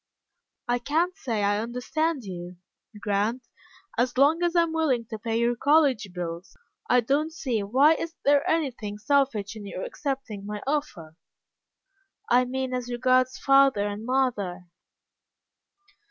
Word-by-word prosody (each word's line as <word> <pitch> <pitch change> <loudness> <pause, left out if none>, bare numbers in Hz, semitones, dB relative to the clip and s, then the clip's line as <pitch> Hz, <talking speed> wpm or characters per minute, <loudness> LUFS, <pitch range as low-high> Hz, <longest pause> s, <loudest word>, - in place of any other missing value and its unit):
"I 245 0 +1
can't 325 +9 0
say 230 - -2
I 205 +1 +2
understand 255 +6 -2
you, 180 -2 -7 0.4
Grant. 210 +5 -1 0.5
As 250 +1 0
long 295 +5 +4
as 345 0 0
I 340 - +5
am 325 -1 -3
willing 280 -8 +1
to 220 - -5
pay 225 +1 -2
your 235 +1 +1
college 275 -6 +3
bills, 175 0 -6 0.3
I 250 - +5
don't 285 +7 0
see 255 -9 -2
why 270 +10 +3 0.2
there 285 0 +5
is - - -10
anything 250 -10 -1
selfish 225 -4 0
in 205 -2 -8
your 185 - -6
accepting 265 -8 -4
my 210 0 -6
offer." 235 - -3 1.1
"I 250 +1 +5
mean 260 0 -3
as 250 -1 -3
regards 255 +1 +2
father 275 -6 +4
and 205 +1 -5
mother." 210 -9 -1
245 Hz, 140 wpm, -26 LUFS, 205-280 Hz, 1.1 s, I